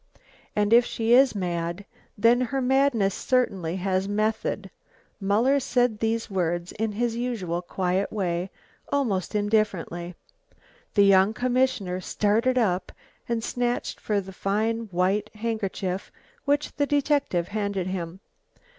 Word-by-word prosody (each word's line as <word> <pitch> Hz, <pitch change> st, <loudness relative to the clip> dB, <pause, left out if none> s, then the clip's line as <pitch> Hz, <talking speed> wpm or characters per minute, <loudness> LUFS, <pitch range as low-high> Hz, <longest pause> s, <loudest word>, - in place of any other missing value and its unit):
And 210 Hz, +1 st, +2 dB
if 240 Hz, +1 st, +8 dB
she 230 Hz, -1 st, 0 dB
is 260 Hz, -1 st, +6 dB
mad, 175 Hz, 0 st, -3 dB, 0.3 s
then 230 Hz, +4 st, +4 dB
her 260 Hz, +2 st, -1 dB
madness 255 Hz, -6 st, +2 dB
certainly 190 Hz, -11 st, 0 dB
has 190 Hz, 0 st, 0 dB
method." 215 Hz, +1 st, -1 dB, 0.5 s
Muller 225 Hz, +8 st, +3 dB
said 245 Hz, -4 st, +1 dB
these 225 Hz, 0 st, 0 dB
words 175 Hz, -3 st, -1 dB
in 220 Hz, 0 st, -2 dB
his 230 Hz, +2 st, -1 dB
usual 220 Hz, -8 st, -2 dB
quiet 185 Hz, +2 st, -1 dB
way, 180 Hz, -3 st, -1 dB, 0.4 s
almost 220 Hz, -9 st, 0 dB
indifferently. 195 Hz, -5 st, 0 dB, 0.8 s
The 200 Hz, -2 st, +6 dB
young 195 Hz, +2 st, +5 dB
commissioner 245 Hz, -7 st, 0 dB
started 220 Hz, +7 st, +1 dB
up 185 Hz, -6 st, +1 dB, 0.4 s
and 230 Hz, -1 st, -1 dB
snatched 245 Hz, +1 st, -2 dB
for 210 Hz, -2 st, 0 dB
the 190 Hz, -1 st, -8 dB
fine 220 Hz, +5 st, -1 dB
white 190 Hz, +4 st, +1 dB
handkerchief 205 Hz, -4 st, -3 dB, 0.3 s
which 290 Hz, +1 st, 0 dB
the 285 Hz, -1 st, +1 dB
detective 285 Hz, -, +1 dB
handed 200 Hz, -3 st, -2 dB
him. 185 Hz, 0 st, -5 dB
210 Hz, 125 wpm, -26 LUFS, 185-240 Hz, 0.8 s, if